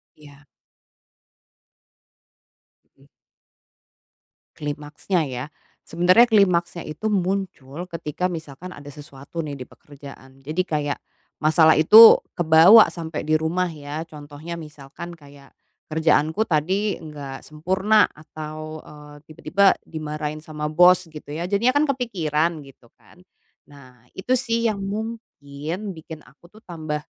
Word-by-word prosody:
Iya. 145 Hz, -1 st, -18 dB, 2.5 s
Hmm. -, -, -23 dB, 1.5 s
Klimaksnya 150 Hz, +5 st, -3 dB
ya. 130 Hz, -2 st, -5 dB, 0.4 s
Sebenarnya 185 Hz, +8 st, +4 dB
klimaksnya 180 Hz, -5 st, +2 dB
itu 185 Hz, +9 st, -4 dB
muncul 180 Hz, -6 st, -3 dB
ketika 165 Hz, +2 st, -3 dB
misalkan 160 Hz, +1 st, -8 dB
ada 145 Hz, -4 st, -12 dB
sesuatu 145 Hz, +2 st, -9 dB
nih 145 Hz, -2 st, -6 dB
di 125 Hz, -, -8 dB
pekerjaan. 135 Hz, -2 st, -15 dB
Jadi 155 Hz, +5 st, -1 dB
kayak, 150 Hz, -4 st, -3 dB, 0.4 s
masalah 160 Hz, 0 st, +5 dB
itu 215 Hz, +9 st, +9 dB, 0.2 s
kebawa 175 Hz, +6 st, +7 dB
sampai 165 Hz, -2 st, -6 dB
di 155 Hz, -, +3 dB
rumah 165 Hz, +4 st, 0 dB
ya, 155 Hz, -1 st, -7 dB
contohnya 150 Hz, +2 st, -9 dB
misalkan 150 Hz, +1 st, -10 dB
kayak 140 Hz, -2 st, -17 dB, 0.4 s
kerjaanku 160 Hz, +5 st, +1 dB
tadi 190 Hz, +6 st, 0 dB
enggak 145 Hz, -4 st, -9 dB
sempurna 190 Hz, +7 st, +2 dB
atau, 155 Hz, 0 st, -9 dB
eee, 150 Hz, -1 st, -14 dB
tiba-tiba 185 Hz, +5 st, +2 dB
dimarahin 150 Hz, -1 st, -5 dB
sama 150 Hz, -1 st, -6 dB
bos 180 Hz, +3 st, +5 dB
gitu 150 Hz, -1 st, -11 dB
ya, 170 Hz, -, -4 dB
jadinya 235 Hz, +6 st, +1 dB
kan 290 Hz, +1 st, +3 dB
kepikiran 170 Hz, -, -1 dB
gitu 135 Hz, -3 st, -18 dB
kan. -, -, -23 dB, 0.5 s
Nah, 125 Hz, -4 st, -18 dB
itu 250 Hz, +7 st, 0 dB
sih 230 Hz, -1 st, 0 dB
yang 200 Hz, -, -6 dB
mungkin 195 Hz, -5 st, -6 dB
bikin 160 Hz, -2 st, -11 dB
aku 140 Hz, +7 st, -21 dB
tuh 215 Hz, +5 st, -19 dB
tambah, 155 Hz, -3 st, -5 dB
160 Hz, 115 wpm, -22 LUFS, 150-185 Hz, 2.5 s, itu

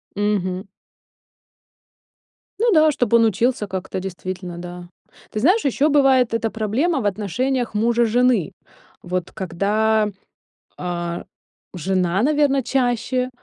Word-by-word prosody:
Мгм. 195 Hz, -2 st, -1 dB, 1.9 s
Ну 465 Hz, 0 st, +3 dB
да, 310 Hz, -2 st, +5 dB
чтоб 245 Hz, -6 st, -1 dB
он 230 Hz, -1 st, +6 dB
учился 225 Hz, +1 st, +1 dB
как-то, 190 Hz, 0 st, -4 dB
действительно, 185 Hz, -1 st, -6 dB
да. 175 Hz, 0 st, -8 dB, 0.4 s
Ты 215 Hz, -, -3 dB
знаешь, 370 Hz, -, +3 dB
еще 275 Hz, +3 st, +2 dB
бывает 265 Hz, -5 st, +4 dB
эта 225 Hz, -1 st, 0 dB
проблема 255 Hz, -, 0 dB
в -, -, -5 dB
отношениях 230 Hz, +6 st, -1 dB
мужа-жены. 235 Hz, -2 st, +2 dB, 0.5 s
Вот 180 Hz, 0 st, -3 dB
когда, 210 Hz, +3 st, 0 dB, 0.7 s
а, 175 Hz, -1 st, -4 dB, 0.5 s
жена, 185 Hz, +1 st, 0 dB
наверно, 285 Hz, -2 st, +2 dB
чаще 250 Hz, 0 st, 0 dB
220 Hz, 105 wpm, -21 LUFS, 185-255 Hz, 1.9 s, он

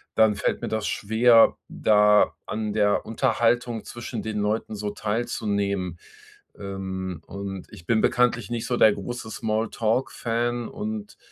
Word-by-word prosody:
dann 110 Hz, -1 st, +4 dB
fällt 100 Hz, -, -1 dB
mir -, -, -3 dB
das 110 Hz, -1 st, -2 dB
schwer, 115 Hz, +2 st, +4 dB
da 105 Hz, -1 st, +4 dB
an 105 Hz, -1 st, -3 dB
der 105 Hz, -1 st, +2 dB
Unterhaltung 120 Hz, +1 st, +1 dB
zwischen 120 Hz, -1 st, -6 dB
den 110 Hz, -1 st, -3 dB
Leuten 105 Hz, +1 st, -1 dB
so 105 Hz, 0 st, -3 dB
teilzunehmen. 100 Hz, -5 st, -2 dB, 0.6 s
Ähm. 95 Hz, -3 st, -5 dB
Und, 100 Hz, -1 st, -6 dB
ich 85 Hz, -, -13 dB
bin 115 Hz, -2 st, +3 dB
bekanntlich 125 Hz, -1 st, +2 dB
nicht 115 Hz, -1 st, -2 dB
so 125 Hz, -, 0 dB
der 110 Hz, -, +6 dB
große 110 Hz, +3 st, -6 dB
Small-Talk-Fan, 115 Hz, +2 st, -1 dB
und 210 Hz, 0 st, -6 dB
110 Hz, 135 wpm, -25 LUFS, 100-120 Hz, 0.6 s, der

